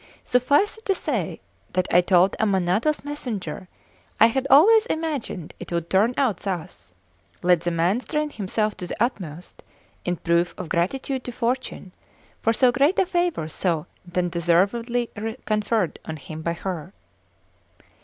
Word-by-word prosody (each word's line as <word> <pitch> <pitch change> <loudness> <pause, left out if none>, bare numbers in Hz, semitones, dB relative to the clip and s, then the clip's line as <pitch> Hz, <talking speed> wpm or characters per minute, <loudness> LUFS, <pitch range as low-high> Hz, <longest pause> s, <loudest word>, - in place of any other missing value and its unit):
Suffice 285 - +2
it 445 - -24
to 390 - +3
say - - -2 0.3
that 185 0 +1
I 175 - +7
told 180 +1 +4
Ammanato's 205 - +1
messenger 220 - -5 0.5
I - - +9
had 265 +4 +1
always 430 - +7
imagined 295 - -3
it - - -8
would 170 -1 -2
turn 215 +6 +3
out 245 -9 +2
thus; 185 -4 -6 0.5
let 175 -2 +4
the 175 - -1
man 175 +6 +1
strain 300 +3 -2
himself 210 0 -1
to 180 - -6
the - - -4
utmost 180 - -3 0.4
in 180 - -1
proof 170 +1 +1
of 180 -3 -6
gratitude 260 +9 -1
to 245 - -4
Fortune 240 -5 -3 0.5
for 225 - +3
so 245 +2 +4
great 280 +9 +2
a 385 - +4
favour 345 - 0
so 160 -1 -1 0.3
undeservedly 185 +8 +1 0.3
conferred 210 -3 0
on 160 - -6
him 155 +2 -8
by 170 +1 -1
her. 175 0 -5
205 Hz, 145 wpm, -24 LUFS, 175-260 Hz, 0.5 s, I